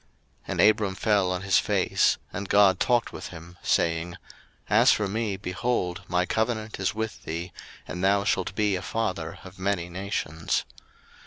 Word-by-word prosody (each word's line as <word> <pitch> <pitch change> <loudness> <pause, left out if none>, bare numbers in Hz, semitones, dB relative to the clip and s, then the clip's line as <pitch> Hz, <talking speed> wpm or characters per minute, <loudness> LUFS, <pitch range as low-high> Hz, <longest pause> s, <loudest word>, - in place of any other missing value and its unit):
01:017:003 - - -37 0.4
And - - +1
Abram 105 -2 +4
fell 100 -3 +2
on 90 0 -2
his 95 -1 +4
face: - - +2 0.2
and 100 -1 -5
God 100 -3 +5
talked 120 -2 +2
with - - -6
him, 85 +1 -11
saying, 85 +1 +1 0.6
01:017:004 - - +5
As - - +7
for 105 - +1
me, 105 -1 -2
behold, 95 -1 -2
my 90 0 +1
covenant 110 0 -1
is 95 +1 0
with 110 0 -4
thee, 85 +2 -5 0.4
and 90 +1 -5
thou 100 +1 +3
shalt 95 -1 0
be 105 -1 +2
a 90 - -3
father 95 -7 -3
of 95 0 -12
many 95 -3 -1
nations. 85 -4 -2
95 Hz, 170 wpm, -26 LUFS, 90-105 Hz, 0.6 s, As